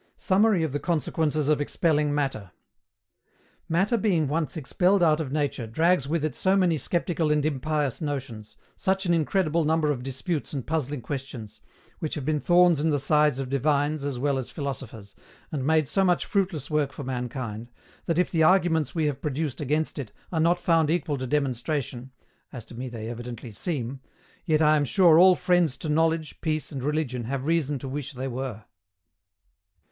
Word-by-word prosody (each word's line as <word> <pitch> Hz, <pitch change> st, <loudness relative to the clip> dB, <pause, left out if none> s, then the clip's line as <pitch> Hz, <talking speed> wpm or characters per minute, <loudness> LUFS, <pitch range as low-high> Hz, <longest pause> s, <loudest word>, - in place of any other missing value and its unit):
SUMMARY 195 Hz, -2 st, +3 dB
OF 160 Hz, -, -1 dB
THE 145 Hz, -, -2 dB
CONSEQUENCES 155 Hz, -2 st, 0 dB
OF 150 Hz, -1 st, +2 dB
EXPELLING 150 Hz, 0 st, +1 dB
MATTER. 135 Hz, -9 st, -2 dB, 1.2 s
Matter 190 Hz, +8 st, +2 dB
being 185 Hz, -8 st, +1 dB
once 155 Hz, +3 st, -2 dB
expelled 180 Hz, +6 st, +2 dB
out 155 Hz, -2 st, +4 dB
of 145 Hz, -5 st, -3 dB
nature 140 Hz, -5 st, -1 dB
drags 160 Hz, +4 st, +2 dB
with 155 Hz, 0 st, 0 dB
it 155 Hz, -, -2 dB
so 190 Hz, +1 st, +1 dB
many 180 Hz, -4 st, +3 dB
sceptical 165 Hz, +1 st, 0 dB
and 150 Hz, -1 st, +2 dB
impious 150 Hz, -2 st, -1 dB
notions, 130 Hz, -8 st, -5 dB, 0.2 s
such 190 Hz, +1 st, 0 dB
an 175 Hz, -, +2 dB
incredible 165 Hz, 0 st, +1 dB
number 155 Hz, -1 st, +2 dB
of 130 Hz, -4 st, -3 dB
disputes 135 Hz, +6 st, -3 dB
and 135 Hz, -4 st, -4 dB
puzzling 150 Hz, -4 st, -2 dB
questions, 130 Hz, -4 st, -7 dB, 0.4 s
which 155 Hz, -, -3 dB
have 145 Hz, -4 st, -5 dB
been 155 Hz, 0 st, +1 dB
thorns 175 Hz, -1 st, +4 dB
in 160 Hz, +2 st, +1 dB
the 145 Hz, -, +2 dB
sides 150 Hz, 0 st, +2 dB
of 135 Hz, -1 st, -3 dB
divines 145 Hz, +2 st, 0 dB
as 140 Hz, -3 st, -3 dB
well 140 Hz, +1 st, 0 dB
as 130 Hz, -, -6 dB
philosophers, 130 Hz, -, -6 dB, 0.4 s
and 140 Hz, -4 st, -2 dB
made 155 Hz, -2 st, +3 dB
so 195 Hz, +7 st, +1 dB
much 180 Hz, -2 st, +2 dB
fruitless 180 Hz, -8 st, -1 dB
work 150 Hz, -2 st, +1 dB
for 145 Hz, -, -8 dB
mankind, 125 Hz, -3 st, -5 dB, 0.4 s
that 165 Hz, -, 0 dB
if 180 Hz, -, +1 dB
the 165 Hz, -, +1 dB
arguments 165 Hz, -2 st, +3 dB
we 160 Hz, -2 st, +1 dB
have 145 Hz, -3 st, -2 dB
produced 150 Hz, -1 st, -3 dB
against 150 Hz, +2 st, -1 dB
it 125 Hz, -7 st, -6 dB, 0.2 s
are 165 Hz, -, -1 dB
not 170 Hz, +2 st, +3 dB
found 165 Hz, -3 st, +2 dB
equal 160 Hz, -4 st, 0 dB
to 130 Hz, -, -3 dB
demonstration 130 Hz, -1 st, -2 dB, 0.4 s
(as 120 Hz, -5 st, -8 dB
to -, -, -13 dB
me 125 Hz, +2 st, -5 dB
they 115 Hz, -2 st, -6 dB
evidently 120 Hz, 0 st, -7 dB
seem), 135 Hz, -, -4 dB, 0.5 s
yet 155 Hz, -1 st, +3 dB
I 155 Hz, 0 st, +5 dB
am 145 Hz, -, +1 dB
sure 170 Hz, +2 st, +5 dB
all 185 Hz, 0 st, +7 dB
friends 175 Hz, -8 st, +2 dB
to 155 Hz, -, -5 dB
knowledge, 160 Hz, 0 st, 0 dB
peace, 155 Hz, -2 st, -2 dB
and 135 Hz, -3 st, -5 dB
religion 135 Hz, -4 st, -2 dB
have 135 Hz, +2 st, -3 dB
reason 155 Hz, -3 st, +1 dB
to 135 Hz, -, -7 dB
wish 140 Hz, +1 st, -5 dB
they 130 Hz, +1 st, -4 dB
were. 125 Hz, -4 st, -5 dB
150 Hz, 185 wpm, -26 LUFS, 135-165 Hz, 1.2 s, all